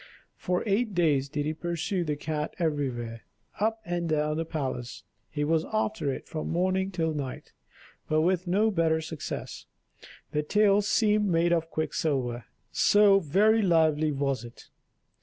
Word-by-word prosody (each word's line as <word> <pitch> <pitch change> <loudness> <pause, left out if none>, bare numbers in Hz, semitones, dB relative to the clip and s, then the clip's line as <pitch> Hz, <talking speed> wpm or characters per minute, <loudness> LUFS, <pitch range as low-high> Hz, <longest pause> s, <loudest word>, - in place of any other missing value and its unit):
For 180 0 -1
eight 210 0 0
days 145 -6 +2
did 145 +1 -2
he 155 - -1
pursue 175 +3 -2
the 150 -3 -2
cat 150 0 -4
everywhere: 130 -8 -2 0.4
up 220 +2 +1
and 175 -1 -2
down 150 0 +1
the 165 +1 -2
palace 130 -5 -4 0.3
he 145 -1 -2
was 160 +1 +2
after 215 -8 -1
it - - -7
from 155 - -4
morning 185 +2 0
till 165 -4 -1
night, 140 -4 -6 0.6
but 155 0 +3
with 180 +2 +1
no 210 +5 +2
better 165 -4 +2
success; 160 -1 -6 0.6
the 150 - 0
tail 205 +5 +3
seemed 210 0 +2
made 170 -1 +2
of 165 -1 0
quicksilver, 135 -7 -2 0.3
so 205 -1 +5
very 205 +7 +3
lively 160 -4 +3
was 140 -3 -1
it. 120 0 -13
160 Hz, 150 wpm, -28 LUFS, 150-190 Hz, 0.6 s, so